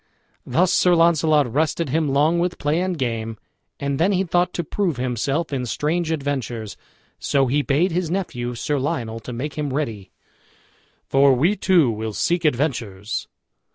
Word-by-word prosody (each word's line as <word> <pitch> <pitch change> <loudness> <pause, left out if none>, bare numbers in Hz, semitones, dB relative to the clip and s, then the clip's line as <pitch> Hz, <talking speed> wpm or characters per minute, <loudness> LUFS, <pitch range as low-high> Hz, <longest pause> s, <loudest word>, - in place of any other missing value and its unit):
Thus 175 +8 +2
Sir 180 -1 +4
Launcelot 155 -6 +3
rested 155 +1 0
him 155 +2 +1
long 150 +5 +2
with 175 0 -1
play 150 +4 0
and 185 -2 -1
game, 115 -4 -3 0.4
and 140 -1 -2
then 190 +5 +3
he 190 0 +2
thought 175 0 +1
to 175 - -1
prove 175 -2 -1
himself 135 +6 -1
in 130 -2 -1
strange 160 +7 -1
adventures; 135 -8 -3 0.4
so 135 -1 +2
he 140 +4 +1
bade 145 +7 +1
his 170 -1 -1
nephew, 125 -10 -3
Sir 145 +4 -1
Lionel, 115 -4 -2
to 115 - -8
make 140 +6 -5
him 145 -2 -2
ready, 115 -9 -3 1.0
"for 135 0 +4
we 165 +11 +2
two 180 - +3
will 110 0 -4
seek 170 - 0
adventures." 120 -8 -1
145 Hz, 160 wpm, -22 LUFS, 125-170 Hz, 1.0 s, Sir